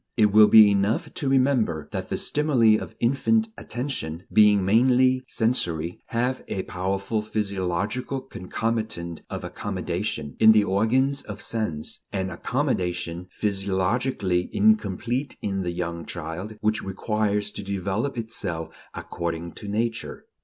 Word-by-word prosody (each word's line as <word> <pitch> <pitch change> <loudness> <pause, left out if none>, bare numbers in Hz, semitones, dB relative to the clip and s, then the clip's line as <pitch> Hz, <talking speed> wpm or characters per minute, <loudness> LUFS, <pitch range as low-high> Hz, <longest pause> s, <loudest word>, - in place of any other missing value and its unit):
It 105 -3 +4
will 105 0 +8
be 105 -2 +8
enough 100 +3 0
to 140 - -2
remember 130 - +2
that - - -4
the - - -1
stimuli 130 -8 +3
of 110 - -5
infant 220 - +2
attention, 110 - -5
being 105 -3 +5
mainly 130 +4 +4
sensory, 90 -8 -1
have 125 +3 -1
a 95 - -3
powerful 95 +4 -2
physiological 105 +4 -2
concomitant 110 -6 -3
of - - -5
"accommodation" 75 -2 -4
in 110 0 +8
the 105 -1 +5
organs 125 +8 +2
of 105 - -8
sense; 105 -10 -3
an 95 -1 -2
accommodation, 90 - -2
physiologically 95 0 0
incomplete 130 - +1
in 95 -1 -2
the 90 - -2
young 85 -1 -4
child, 85 +6 -6
which 110 +1 +1
requires 105 +1 -1
to - - -6
develop 100 +6 -2
itself 95 -8 -4 0.3
according 85 0 -4
to 105 - -10
Nature. 115 +3 -3
105 Hz, 125 wpm, -25 LUFS, 90-120 Hz, 0.3 s, will